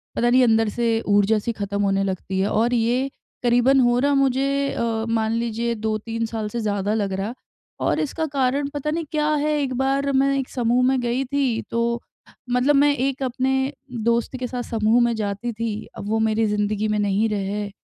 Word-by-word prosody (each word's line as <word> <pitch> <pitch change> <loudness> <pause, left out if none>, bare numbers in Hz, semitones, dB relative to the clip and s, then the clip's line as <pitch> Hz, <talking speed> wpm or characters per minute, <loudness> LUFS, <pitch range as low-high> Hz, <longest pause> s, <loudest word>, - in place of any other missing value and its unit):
पता 240 +1 +2
नहीं 255 +1 +5
अंदर 225 -2 +3
से 230 0 0
ऊर्जा-सी 205 +2 +2
खत्म 200 -1 -3
होने 195 -1 +1
लगती 190 0 -3
है 195 - +2
और 235 +3 +1
ये 245 +4 +1 0.3
करीबन 245 +3 +4
हो 240 -1 +3
रहा 285 +2 +2
मुझे 275 +1 +1
अ, 225 -1 -1
मान 220 -1 +1
लीजिए 235 0 -1
2-3 220 +1 -2
साल 220 -1 -4
से 235 - -4
ज़्यादा 205 -1 -1
लग 200 -3 -1
रहा, 200 +5 -3 0.5
और - - 0
इसका 315 +2 -2
कारण 275 +1 +1
पता 290 +1 -3
नहीं 330 0 -2
क्या 300 -1 0
है। 300 +1 0
एक 260 -2 -2
बार 275 +1 +1
मैं 275 +1 +3
एक 265 - -3
समूह 245 0 +1
में 265 -1 +2
गई 240 +3 0
थी, 265 -4 0
तो 235 0 -1 0.5
मतलब 250 +4 +3
मैं 285 +1 +4
एक 270 0 -1
अपने 265 +2 0 0.3
दोस्त 235 +2 +1
के 250 - -2
साथ 245 -1 -4
समूह 225 +1 +2
में 235 -1 +2
जाती 210 +2 -3
थी, 220 -1 -4
अब 205 - -6
वो 220 - +1
मेरी 220 0 +2
ज़िंदगी 210 +1 0
में 210 - 0
नहीं 205 +2 +1
रहे 205 0 -2
235 Hz, 195 wpm, -22 LUFS, 215-265 Hz, 0.5 s, नहीं